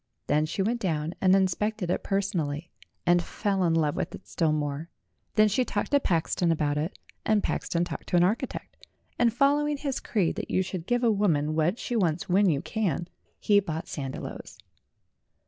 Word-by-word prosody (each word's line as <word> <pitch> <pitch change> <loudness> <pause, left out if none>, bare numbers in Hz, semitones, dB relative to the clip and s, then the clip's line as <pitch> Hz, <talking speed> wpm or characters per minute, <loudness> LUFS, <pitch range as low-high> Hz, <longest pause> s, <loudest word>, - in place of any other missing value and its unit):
Then 155 +1 +2
she 190 +4 -1
went 235 +4 0
down 160 -5 -1
and 190 0 +5
inspected 195 0 0
it - - 0
personally, 170 -6 -1 0.3
and 175 0 +4
fell 195 +2 -1
in 165 -2 +2
love 155 -3 +1
with - - -3
it - - -13
still 160 -3 +1
more. 150 +1 -2 0.5
Then 215 0 +6
she 215 +5 +2
talked 210 -1 -3
to 285 - +5
Paxton 170 - +1
about 150 -2 +1
it, 155 +5 -2 0.3
and 215 -2 +2
Paxton 170 0 -1
talked 175 - -6
to - - +1
an 175 - +5
architect, 220 +8 -2 0.3
and 240 -1 +4
fol 275 +5 +3
lowing 295 0 0
his 280 -2 -2
creed 195 -4 0
that 215 - -4
you 185 - +2
should 180 -2 -6
give 245 0 +1
a 230 - +5
woman 160 -8 +1
what 160 +6 +1
she 245 - -4
wants 175 -4 +1
when 195 +1 +4
you 145 -4 0
can, 180 -6 -1 0.3
he 205 -1 +4
bought 165 -5 -4
Sandiloes. 135 -3 -6
185 Hz, 190 wpm, -27 LUFS, 160-215 Hz, 0.5 s, Then